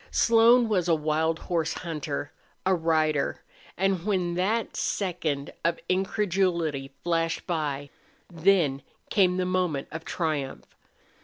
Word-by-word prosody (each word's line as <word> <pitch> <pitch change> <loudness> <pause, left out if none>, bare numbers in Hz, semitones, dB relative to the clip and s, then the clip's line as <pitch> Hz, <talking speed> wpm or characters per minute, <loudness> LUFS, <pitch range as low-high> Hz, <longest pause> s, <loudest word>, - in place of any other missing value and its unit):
Slone 230 +1 +5
was 185 -5 +1
a 165 - +4
wild 155 +1 0
horse 165 -2 -1
hunter, 155 -4 -4 0.3
a 190 - +4
rider, 155 -4 +1 0.3
and 190 -2 +1
when 185 -4 0
that 210 +6 0
second 160 -7 -2
of 170 0 +1
incredulity 185 -7 0
flashed 165 -1 0
by, 145 -5 -2 0.4
then 165 -5 +2 0.3
came 185 -4 +3
the 185 - 0
moment 180 -6 -1
of 160 0 -6
triumph. 155 -7 -3
170 Hz, 120 wpm, -27 LUFS, 155-185 Hz, 0.4 s, Slone